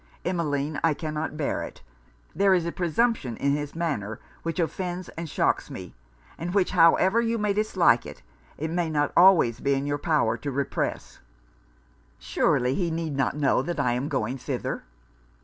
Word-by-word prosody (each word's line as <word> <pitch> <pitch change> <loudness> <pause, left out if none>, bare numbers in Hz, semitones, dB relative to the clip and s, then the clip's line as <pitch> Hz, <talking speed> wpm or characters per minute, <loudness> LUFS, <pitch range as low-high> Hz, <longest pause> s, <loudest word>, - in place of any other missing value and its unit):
Emmeline, 150 -4 -1
I 165 -2 +3
cannot 155 0 -4
bear 150 - -1
it! - - -8 0.5
there 195 +1 +4
is 175 -2 0
a 170 - -2
presumption 180 - 0
in 140 - +1
his 145 +1 -3
manner, 125 -11 -2 0.2
which 165 0 -3
offends 180 +2 -2
and 165 -1 -7
shocks - - 0
me; - - -8 0.5
and 175 +3 -4
which, 195 -3 +2
however 185 +5 +5
you 230 0 0
may 210 -2 +1
dislike 190 - +3
it, - - -11 0.3
it 160 +2 -3
may 170 -1 0
not 145 -2 0
always 170 - +6
be 140 +1 +1
in 135 +1 -2
your 145 0 -1
power 145 -9 +1
to 145 - -5
repress!' 140 0 -3 1.0
'Surely 125 +1 +1
he 175 +2 0
need 160 -3 -3
not 135 +1 0
know 140 -3 +2
that 170 +3 -4
I 125 -4 +2
am 130 +4 -2
going 125 +5 -2
thither.' - - -4
160 Hz, 170 wpm, -26 LUFS, 140-175 Hz, 1.0 s, always